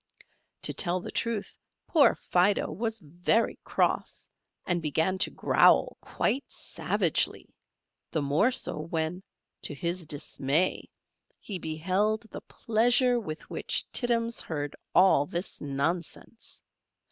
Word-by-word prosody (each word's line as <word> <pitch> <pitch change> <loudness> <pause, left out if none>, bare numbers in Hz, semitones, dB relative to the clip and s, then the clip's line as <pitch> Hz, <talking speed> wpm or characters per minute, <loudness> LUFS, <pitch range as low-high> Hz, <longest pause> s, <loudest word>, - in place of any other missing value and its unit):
To - - -1
tell 180 -1 0
the - - -7
truth, 230 -3 -3 0.3
poor 305 -4 +4
Fido 185 +3 +1
was 220 +6 -3
very 175 +9 0
cross, - - -1 0.4
and 175 -1 0
began 160 +5 0
to - - +3
growl - - +4
quite 275 +2 -2
savagely; - - -1 0.6
the 155 - -1
more 150 - +3
so 250 -10 -2
when, 160 +2 -3 0.4
to 145 - -1
his 170 +3 -3
dismay, 150 +3 0 0.5
he 195 -4 -5
beheld 185 +7 0
the - - -7
pleasure 245 +2 +2
with 155 -8 -7
which - - 0
Tittums 235 -2 +1
heard 145 -3 -4 0.2
all 180 -6 +5
this 175 +5 -4
nonsense. 160 +10 -4
180 Hz, 115 wpm, -28 LUFS, 155-220 Hz, 0.6 s, all